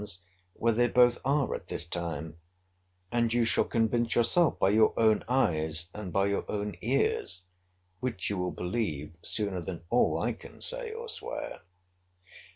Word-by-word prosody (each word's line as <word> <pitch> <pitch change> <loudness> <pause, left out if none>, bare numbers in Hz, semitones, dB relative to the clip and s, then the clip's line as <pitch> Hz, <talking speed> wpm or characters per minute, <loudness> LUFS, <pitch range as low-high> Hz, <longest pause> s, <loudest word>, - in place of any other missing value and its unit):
's, 100 -4 -7 0.4
where 115 0 +1
they 120 +2 +3
both 120 0 +4
are 140 +1 +1
at - - -6
this - - -2
time; 80 -2 -4 0.7
and 120 -1 +1
you 120 -1 +3
shall - - +3
convince 115 +1 +1
yourself 150 +8 +3
by - - +3
your 110 +2 +4
own 110 -2 +4
eyes, 80 -9 +1
and 105 -4 -6
by 100 +2 +2
your 100 0 0
own 105 0 -2
ears; 105 -7 0 0.5
which 120 -8 -2
you 100 - 0
will 90 -1 -1
believe 90 -6 -3
sooner 100 -4 -1
than 85 0 -6
all 125 - +3
I - - 0
can - - -13
say - - -2
or 465 +2 -6
swear. 450 - -5
110 Hz, 160 wpm, -29 LUFS, 90-120 Hz, 0.7 s, both